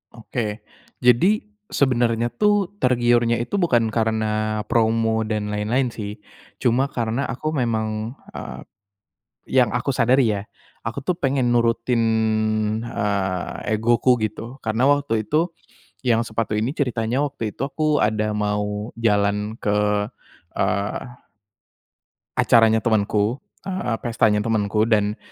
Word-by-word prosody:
Oke. 110 -2 -4 0.4
Jadi 170 - +4 0.2
sebenarnya 120 -3 +1
tuh 205 +7 +2
tergiurnya 120 -2 +3
itu 200 +10 -2
bukan 120 -10 +2
karena 110 -1 0
promo 110 -1 +2
dan 105 -1 -2
lain-lain 115 +5 0
sih, 105 -2 -6 0.5
cuma 125 +3 +3
karena 120 +1 -2
aku 155 +7 -3
memang, 110 -3 -2 0.2
eee - - -7 0.9
yang 125 -4 +3
aku - - -1
sadari 125 0 +3
ya, 100 - -6 0.4
aku - - -3
tuh 175 +6 -1
pengen 135 -4 +1
nurutin, 115 0 +2 0.8
eee, 100 -3 -2
egoku 120 +2 +3
gitu 115 +5 -4
karena 110 +3 -1
waktu 140 -7 +1
itu 155 - +1 0.5
yang 115 -3 +2
sepatu 110 -1 -2
ini 115 +4 0
ceritanya 125 -1 0
waktu 115 -7 -4
itu - - -6
aku 150 +2 +1
ada 105 0 +1
mau 105 +1 -2
jalan 105 -1 +1
ke, 105 0 +1 0.5
eee 100 +1 0 1.4
acaranya 115 -1 +5
temenku, 110 +2 +1 0.2
eee, 185 -12 -2
pestanya 110 -3 +2
temenku 110 -1 +1
dan 105 -2 +1
115 Hz, 115 wpm, -22 LUFS, 105-125 Hz, 1.4 s, acaranya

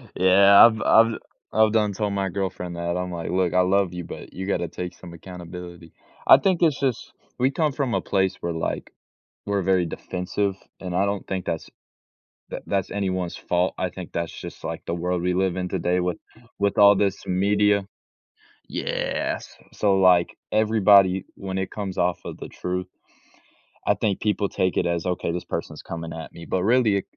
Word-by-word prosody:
Yeah, 100 +3 +7
I've 110 -2 +3
I've 115 0 +5 0.4
I've 110 -1 +4
done 105 -2 +2
told 105 0 -2
my 100 -1 -1
girlfriend 90 -2 -4
that, 85 +1 -2
I'm 90 0 -3
like, 85 -1 -5
"Look, 90 -1 +1
I 90 - +4
love 95 0 +2
you, 90 -1 -5
but - - -9
you 95 +1 -5
gotta 85 -3 0
take 90 +2 -6
some 85 -2 -12
accountability." 85 -1 -10 0.3
I - - +10
think 180 +4 +1
it's 160 -5 +3
just 130 -5 -2 0.3
we 130 +2 +3
come 155 +1 +1
from 130 -4 -1
a - - 0
place 95 -1 0
where, 85 -1 -2
like, 80 - -3 0.5
we're 100 -1 0
very 95 -1 +2
defensive, 90 +4 -3 0.2
and 90 -1 -5
I 95 - +3
don't 100 0 -2
think 95 -1 -3
that's 80 -2 -4 0.8
that - - -5
that's 100 -1 -1
anyone's 95 -3 -2
fault, 90 +1 0
I 90 -1 -1
think 90 -2 -9
that's 85 -1 -3
just - - -9
like - - -4
the 85 - -2
world 90 0 -2
we 90 0 +1
live 95 -1 +1
in 90 0 -2
today 90 0 0
with 90 0 -2 0.4
with 100 -1 0
all 100 0 +8
this 100 -1 0
media. 100 +2 +2 0.8
Yes, - - -3 0.2
so 100 -2 +2
like 90 -2 +4 0.2
everybody 100 -3 +4
when 95 -1 -5
it 95 - -3
comes 95 -3 -5
off 90 0 +1
of - - -7
the - - -8
truth, 90 0 -4 1.0
I - - +3
think 100 -3 -1
people 105 -1 +1
take 95 -1 0
it - - +2
as, 85 0 -1
"Okay 90 -2 -1
this 90 - -3
person's - - -5
coming 85 0 -6
at 80 -1 -8
me," 85 - -10
but 90 - -1
really, 110 -3 +3
95 Hz, 190 wpm, -24 LUFS, 90-100 Hz, 1.0 s, I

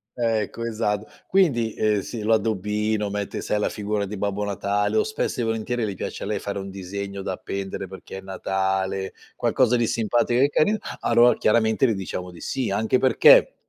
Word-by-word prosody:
eh, 115 -3 +1
ecco, 115 +3 -7
esatto. 105 -2 -1 0.2
Quindi, 130 - +2
ehm, 105 -1 +2
si 110 0 -6
l'addobbino, 105 -1 0
mette 100 0 -3
sai 105 - -1
la - - +1
figura 105 -1 -2
di 105 +2 -6
Babbo 105 +1 -1
Natale 100 +1 -1
o - - +4
spesso 215 - -2
e - - 0
volentieri 115 +2 -1
le 100 -2 -4
piace - - -5
a - - -3
lei 105 -1 -1
fare 100 0 -4
un 95 0 -6
disegno 100 +1 -6
da 95 - -3
appendere 95 +1 -5
perché 95 0 -9
è - - -7
Natale, 95 0 -2 0.2
qualcosa 125 -2 +2
di 120 - +2
simpatico 120 +2 +1
e 140 - +6
carin 210 +9 +2 0.2
allor 120 +1 +5
chiaramente 110 +2 +3
le 110 - +1
diciamo 90 -1 -5
di 85 - -13
sì. 130 -7 -2
Anche 110 +5 +1
perché 130 -3 +6
105 Hz, 190 wpm, -24 LUFS, 100-115 Hz, 0.2 s, e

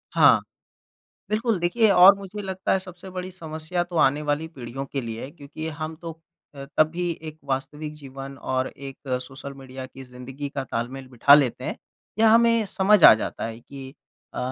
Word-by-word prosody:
हाँ। - - +7 0.9
बिल्कुल, 215 -1 +1
देखिए 220 +6 +3
और 190 +1 +9
मुझे 200 +1 -7
लगता 190 -1 -2
है - - +3
सबसे 185 0 -10
बड़ी 185 0 -5
समस्या 160 0 -4
तो 175 -1 -8
आने 145 +2 +3
वाली 150 +2 -1
पीढ़ियों 135 -2 -7
के 140 - -1
लिए 115 -1 -6
है 135 - -8
क्योंकि 155 +1 -8
हम 155 +1 -5
तो 165 -1 -5 0.4
अ, 140 -1 -8
तब 155 - +6
भी 175 +1 -2 0.2
एक 155 0 -10
वास्तविक 150 +3 -4
जीवन 135 -1 -9
और 130 -1 -1
एक 135 -1 -10 0.2
सोशल 135 +2 -9
मीडिया 130 -1 -9
की 135 +1 -12
ज़िंदगी 130 +3 -7
का 135 -1 -4
तालमेल 130 +2 -5
बिठा 135 +3 +6
लेते 140 -5 +2
हैं। - - -3 0.4
या 225 0 +6
हमें 230 0 +5
समझ 195 0 +3
आ - - +12
जाता 110 - -4
है 115 +1 -7
कि 135 +1 -11 0.4
अ, - - -5
150 Hz, 185 wpm, -24 LUFS, 135-180 Hz, 0.9 s, आ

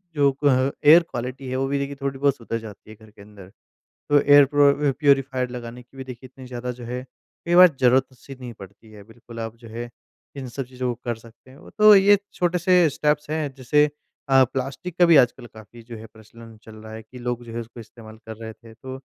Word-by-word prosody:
जो 140 -1 +3
अ, 135 -1 +1
air 160 +4 +8
quality 130 -2 -7
है 130 - -3
वो 135 - -1
भी 140 +1 -1
देखिए 140 0 -4
थोड़ी 135 -1 -4
बहुत 140 -1 +2
सुधर 115 -1 -5
जाती 110 -1 -13
है 110 - -11
घर 110 0 -19
के 105 - -18
अंदर। 100 -2 -15 0.6
तो 145 - +5
एयर 145 0 +6
प्रो 145 0 +4 0.2
व - - +2
प्यूरीफ़ायर 135 -3 +1
लगाने 120 0 -8
की 125 +3 -24
भी 135 - -7
देखिए 130 0 -10
इतनी 130 -1 -13
ज़्यादा 125 0 -6
जो 125 0 -11
है 125 +2 -5 0.4
कई 170 - +1
बार 180 +1 +9
ज़रूरत-सी 130 +1 0
नहीं 125 -2 -8
पड़ती 105 +1 -15
है। 105 -1 -13
बिल्कुल 115 +1 -12
आप 115 0 -6
जो 115 0 -14
है 120 +2 -7 0.5
इन 135 -2 -7
सब 135 +3 -5
चीज़ों 130 0 -5
को - - -26
कर 120 -1 -2
सकते 115 +3 -19
हैं। 135 - -16
तो 215 0 +8
ये 200 +1 +5 0.2
छोटे 180 0 0
से 180 -1 +3
स्टेप्स 150 +1 -1
हैं 155 -3 -2
जैसे 140 +3 +2 0.4
अ, 135 -1 +5
प्लास्टिक 135 +7 -6
का 175 - +6
भी 170 -2 +6
आजकल 125 -2 +2
काफ़ी 110 +1 -15
जो 115 0 -10
है 110 - -11
प्रचलन 115 +1 -15
चल 110 - -13
रहा 110 0 -12
है 110 0 -9
कि 125 +4 -14
लोग 120 0 -4
जो 115 - -11
है 120 - -3
उसको 115 +1 -11
इस्तेमाल 110 0 -14
कर 110 -1 -8
रहे 110 0 -7
थे। 115 0 -17
तो 130 +3 -9
125 Hz, 235 wpm, -22 LUFS, 115-140 Hz, 0.6 s, बार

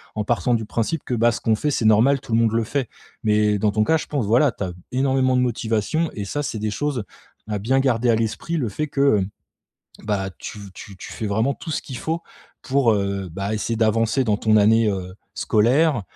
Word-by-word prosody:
en 105 - -1
partant 120 +2 +1
du 110 - -2
principe 115 +8 -2
que - - -3
bah, 120 +1 +3
ce - - -5
qu'on 110 -1 +2
fait, 150 - -1
c'est 130 - -1
normal, 120 +6 +4
tout 120 - -11
le 115 - +4
monde 115 -1 +2
le 115 0 +1
fait. 135 +2 -2 0.4
Mais 105 -1 +2
dans 105 0 +2
ton 110 +1 +2
cas, 160 - +3
je - - -5
pense, 140 -7 -1
voilà, 120 +7 +4
tu - - -5
as 90 - -4 0.2
énormément 130 -1 +2
de - - +3
motivation 115 +6 0
et 105 - -4
ça, 145 +9 -3
c'est 110 - -4
des 105 0 -2
choses 140 -1 -2 0.5
à 105 - -2
bien 130 +6 +1
garder 125 -2 +1
à 115 - +5
l'esprit 115 +9 -2
le 125 -8 -1
fait 150 +10 -3
que 140 -6 +3
mmh, 95 +1 -6 0.6
bah, 100 -2 -1
tu 105 - -7
tu 100 -2 -11
tu - - -9
fais 110 - -4
vraiment 110 +7 +1
tout 160 - -8
ce - - -2
qu'il 130 -3 -8
faut 165 +1 -3 0.4
pour, 130 -4 +2
heu, 100 -2 -2
bah, 100 +4 -3
essayer 110 +1 -2
d'avancer 115 +3 +2
dans 105 -2 +1
ton 110 -1 +3
année, 110 +1 +4
heu, 90 -2 -4 0.2
scolaire, 125 +5 +2
115 Hz, 230 wpm, -22 LUFS, 105-135 Hz, 0.6 s, à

